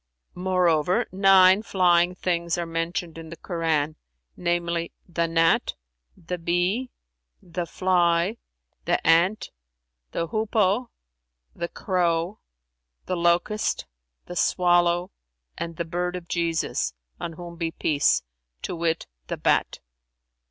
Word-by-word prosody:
Moreover, 180 Hz, +2 st, +2 dB
nine 190 Hz, 0 st, +6 dB
flying 180 Hz, -4 st, +3 dB
things 170 Hz, -2 st, -1 dB
are 175 Hz, -, -2 dB
mentioned 165 Hz, 0 st, -3 dB
in 160 Hz, -1 st, -9 dB
the 170 Hz, -, -9 dB
Koran, 160 Hz, -3 st, -1 dB, 0.4 s
namely, 170 Hz, -1 st, -1 dB, 0.2 s
the 170 Hz, -1 st, 0 dB
gnat, 165 Hz, 0 st, +2 dB, 0.4 s
the 180 Hz, 0 st, -5 dB
bee, 180 Hz, +9 st, 0 dB, 0.5 s
the 175 Hz, -3 st, -5 dB
fly, 175 Hz, +3 st, +2 dB, 0.5 s
the -, -, +3 dB
ant, 170 Hz, +6 st, +3 dB, 0.6 s
the 165 Hz, -1 st, -3 dB
hoopoe, 215 Hz, +1 st, +1 dB, 0.7 s
the 170 Hz, -, -3 dB
crow, 175 Hz, +1 st, -1 dB, 0.7 s
the 185 Hz, -, -1 dB
locust, 175 Hz, +5 st, +1 dB, 0.4 s
the 175 Hz, -, -8 dB
swallow 175 Hz, 0 st, +2 dB, 0.4 s
and 170 Hz, 0 st, -5 dB
the 170 Hz, -, -2 dB
bird 180 Hz, +2 st, -2 dB
of 175 Hz, -1 st, -7 dB
Jesus[FN#351] 170 Hz, -2 st, -1 dB, 0.3 s
(on 165 Hz, -, -4 dB
whom 170 Hz, +1 st, -9 dB
be 165 Hz, -1 st, -1 dB
peace!), 145 Hz, -, +2 dB, 0.4 s
to 180 Hz, -, -3 dB
wit, 165 Hz, -1 st, -1 dB, 0.2 s
the -, -, -3 dB
bat." -, -, +1 dB
175 Hz, 115 wpm, -25 LUFS, 165-185 Hz, 0.7 s, nine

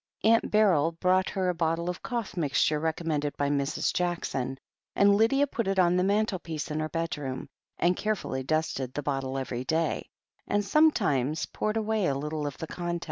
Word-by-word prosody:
Aunt 225 Hz, +1 st, +4 dB
Beryl 180 Hz, -7 st, +3 dB
brought 185 Hz, +2 st, +2 dB
her 190 Hz, -2 st, -1 dB
a -, -, +1 dB
bottle 165 Hz, 0 st, -1 dB
of 180 Hz, 0 st, -3 dB
cough 235 Hz, -6 st, -4 dB
mixture 150 Hz, -2 st, +1 dB
recommended 155 Hz, -2 st, -1 dB
by 145 Hz, 0 st, +1 dB
Mrs. 140 Hz, +1 st, 0 dB
Jackson, 150 Hz, -7 st, -2 dB, 0.4 s
and 200 Hz, 0 st, +5 dB
Lydia 230 Hz, +7 st, +4 dB
put 230 Hz, -6 st, -3 dB
it 195 Hz, 0 st, 0 dB
on 180 Hz, -1 st, +4 dB
the 180 Hz, -, +2 dB
mantlepiece 185 Hz, -6 st, -1 dB
in 150 Hz, -, -1 dB
her 155 Hz, 0 st, -2 dB
bedroom, 150 Hz, -6 st, -3 dB, 0.3 s
and 175 Hz, +2 st, +2 dB
carefully 205 Hz, -11 st, -2 dB
dusted 135 Hz, -3 st, -1 dB
the 145 Hz, -, -2 dB
bottle 135 Hz, -1 st, -2 dB
every 130 Hz, -2 st, -3 dB
day, 160 Hz, +4 st, -1 dB, 0.4 s
and 205 Hz, 0 st, +1 dB
sometimes 195 Hz, -, +2 dB
poured 215 Hz, +1 st, -2 dB
away 220 Hz, -3 st, 0 dB
a 135 Hz, -, +1 dB
little 150 Hz, +1 st, -3 dB
of 145 Hz, -, -6 dB
the -, -, -5 dB
contents. 175 Hz, +1 st, -3 dB
165 Hz, 180 wpm, -28 LUFS, 145-195 Hz, 0.4 s, and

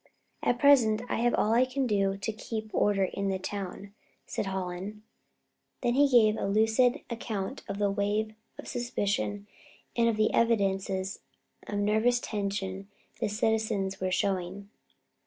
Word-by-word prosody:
At 245 Hz, -, +1 dB
present, 240 Hz, -5 st, +5 dB
I -, -, 0 dB
have 240 Hz, +1 st, +2 dB
all 215 Hz, -, +2 dB
I 240 Hz, +2 st, +5 dB
can 260 Hz, +1 st, -1 dB
do 195 Hz, -4 st, +1 dB
to 220 Hz, +3 st, -3 dB
keep 220 Hz, 0 st, -5 dB
order 205 Hz, -1 st, +2 dB
in 195 Hz, +1 st, -2 dB
the 190 Hz, -, 0 dB
town," 195 Hz, +1 st, -6 dB, 0.3 s
said -, -, -3 dB
Hallen. 190 Hz, +2 st, -4 dB, 0.8 s
Then 240 Hz, -, +1 dB
he 285 Hz, +2 st, +4 dB
gave 220 Hz, -4 st, +5 dB
a -, -, -1 dB
lucid 225 Hz, +6 st, +3 dB
account 225 Hz, +1 st, -4 dB
of 200 Hz, -, -3 dB
the 205 Hz, -1 st, +1 dB
wave 210 Hz, +2 st, 0 dB, 0.2 s
of -, -, -9 dB
suspicion 205 Hz, -4 st, -2 dB, 0.5 s
and 235 Hz, -1 st, +3 dB
of 220 Hz, -, -1 dB
the 215 Hz, 0 st, +2 dB
evidences 195 Hz, -4 st, +1 dB, 0.5 s
of 205 Hz, -, -3 dB
nervous 220 Hz, +4 st, +2 dB
tension 195 Hz, -3 st, -3 dB, 0.3 s
the 225 Hz, -, 0 dB
citizens 210 Hz, -3 st, 0 dB
were 185 Hz, -, 0 dB
showing. 195 Hz, +1 st, -2 dB
210 Hz, 150 wpm, -29 LUFS, 195-230 Hz, 0.8 s, present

